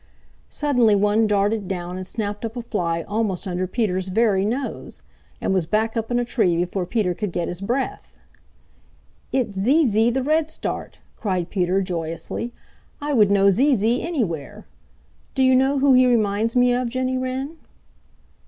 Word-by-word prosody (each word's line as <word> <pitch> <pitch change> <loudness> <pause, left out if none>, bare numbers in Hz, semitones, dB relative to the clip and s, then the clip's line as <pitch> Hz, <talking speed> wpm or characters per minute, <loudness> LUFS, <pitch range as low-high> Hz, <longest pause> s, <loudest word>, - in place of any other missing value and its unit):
Suddenly 250 -8 +2
one 210 +2 +3
darted 205 0 +1
down 180 -1 -4
and 185 0 -5
snapped 210 -1 -4
up 230 +1 -4
a 240 - -4
fly 170 -7 -2
almost 205 -3 -2
under 185 0 -2
Peter's 190 -3 -1
very 200 -1 +2
nose 250 +6 -4 0.4
and - - 0
was 180 -4 0
back 220 +3 0
up 225 -1 -2
in 240 - +1
a 245 - 0
tree 200 -8 +1
before 180 +1 -2
Peter 205 -4 0
could 205 +1 -4
get 170 0 -2
his 175 +1 -5
breath. 245 +7 -3 1.2
"It's 245 -6 -1
Zee 270 +12 +3
Zee 220 0 +3
the 260 +2 -1
Redstart!" 315 +2 -2 0.2
cried 185 -4 -2
Peter 185 0 +1
joyously. 170 +6 -4 0.5
"I 290 0 -2
would 210 -6 +5
know 200 0 +5
Zee 265 +8 +3
Zee 230 +3 +1
anywhere. 210 - -3 0.7
Do 265 - +2
you 260 0 +5
know 265 +2 +3
who 275 0 +4
he 255 0 +6
reminds 220 -1 +1
me 245 0 +4
of, 245 0 0
Jenny 255 +1 -1
Wren?" 260 +5 -4
220 Hz, 165 wpm, -22 LUFS, 190-255 Hz, 1.2 s, he